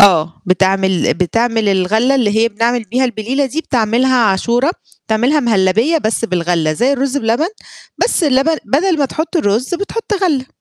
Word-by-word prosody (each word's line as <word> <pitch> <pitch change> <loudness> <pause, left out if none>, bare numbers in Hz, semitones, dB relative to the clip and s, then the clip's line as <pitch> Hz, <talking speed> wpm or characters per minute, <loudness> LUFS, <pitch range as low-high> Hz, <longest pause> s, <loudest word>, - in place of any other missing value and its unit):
آه. - - +10
آه، 170 -4 +1
بتعمل 190 0 +1
بتعمل 225 +4 0
الغلّة 210 +7 +1
اللي 245 -6 +1
هي 230 +1 +3
بنعمل 230 +2 -1
بيها 245 +6 -1
البليلة 250 +4 -1
دي 290 +5 -3
بتعملها 250 -1 +1
عاشورة، 235 - +1 0.4
بتعملها 245 +8 +1
مهلّبية 225 - +2
بس 225 -3 -2
بالغلّة 170 -5 0
زي 245 - +1
الرُز 275 0 -1
بلبن، 235 +6 0 0.6
بس 470 - 0
اللبن 290 +2 +2
بدل 320 - +1
ما 285 - +2
تحُط 315 +6 -3
الرُز 235 - 0
بتحُط 405 +5 -4
غلّة. 285 -8 0
235 Hz, 160 wpm, -15 LUFS, 200-275 Hz, 0.6 s, آه